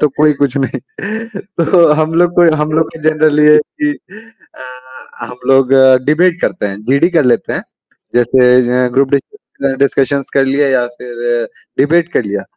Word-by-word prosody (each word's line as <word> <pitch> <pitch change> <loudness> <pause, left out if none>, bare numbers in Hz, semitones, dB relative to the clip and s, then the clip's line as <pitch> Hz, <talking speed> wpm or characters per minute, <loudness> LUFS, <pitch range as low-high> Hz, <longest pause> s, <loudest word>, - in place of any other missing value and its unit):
तो 150 - +3
कोई 150 0 +4
कुछ 140 -1 0
नहीं। 135 - -3 0.8
तो 170 -2 +4
हम 155 +1 -1
लोग 175 +1 +3
को 170 -1 +5
हम 150 0 -2
लोग 160 0 0
के - - -13
जनरली 155 -1 +2
ये 150 - +6
है - - +6 0.2
कि 300 - +1 0.6
अ, 130 -1 -12
हम 125 - -10
लोग 135 -1 +3 0.3
डिबेट 170 +4 +1
करते 175 - -2
हैं, 100 +1 -7
जीडी 140 +8 +1
कर 165 -5 +1
लेते 125 -1 0
हैं। - - -3 0.5
जैसे 125 +1 +3 0.3
अ, - - -1
ग्रुप 135 +1 +1
डिस्क 140 - -2 0.4
डिस्कशन्स 140 0 0
कर 135 - +1
लिया 140 +1 +1
या 130 -2 +1
फिर 120 -1 -3 0.3
डिबेट 170 +4 +2
कर - - 0
लिया। 100 -1 -4
140 Hz, 175 wpm, -13 LUFS, 125-155 Hz, 0.8 s, ये